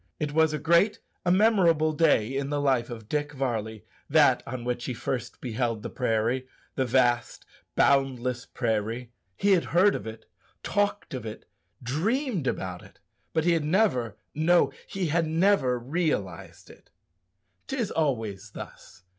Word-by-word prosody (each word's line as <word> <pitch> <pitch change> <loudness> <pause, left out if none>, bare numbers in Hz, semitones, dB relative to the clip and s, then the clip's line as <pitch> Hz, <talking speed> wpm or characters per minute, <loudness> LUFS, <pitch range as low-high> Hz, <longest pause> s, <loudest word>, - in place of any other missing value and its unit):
It 150 -1 -2
was 160 0 +4
a 155 - -1
great, 170 +7 +3 0.3
a - - +5
memorable 180 -6 +4
day 140 -6 +2
in 140 0 -2
the 145 0 -1
life 130 -4 +1
of 110 -3 -8
Dick 145 +2 -2
Varley, 110 -5 -3 0.2
that - - +5
on 125 0 -5
which 120 0 -3
he 125 - -3
first 120 0 -4
beheld 115 -2 -2
the - - -5
prairie 120 +2 0 0.3
the 130 - 0
vast 120 -1 +1 0.3
boundless 125 -3 +1
prairie. 115 +1 -2 0.3
He 200 - +2
had 180 -3 +4
heard 185 +4 +4
of 100 - -5
it, 110 0 -9 0.4
talked 205 -4 -1
of 130 - -4
it, 110 -1 -8 0.4
dreamed 190 - -1
about 90 -6 -3
it, - - -17 0.3
but 160 - +1
he 175 - +4
had 165 -2 +1
never 150 - +1 0.2
no, 170 +3 +3 0.2
he 195 -2 -3
had 165 +1 +1
never 160 -6 +2
realized 135 - -3
it. - - -20 0.8
'Tis 250 -6 -2
always 115 -9 -1
thus. 90 - -11
135 Hz, 155 wpm, -27 LUFS, 120-165 Hz, 0.8 s, a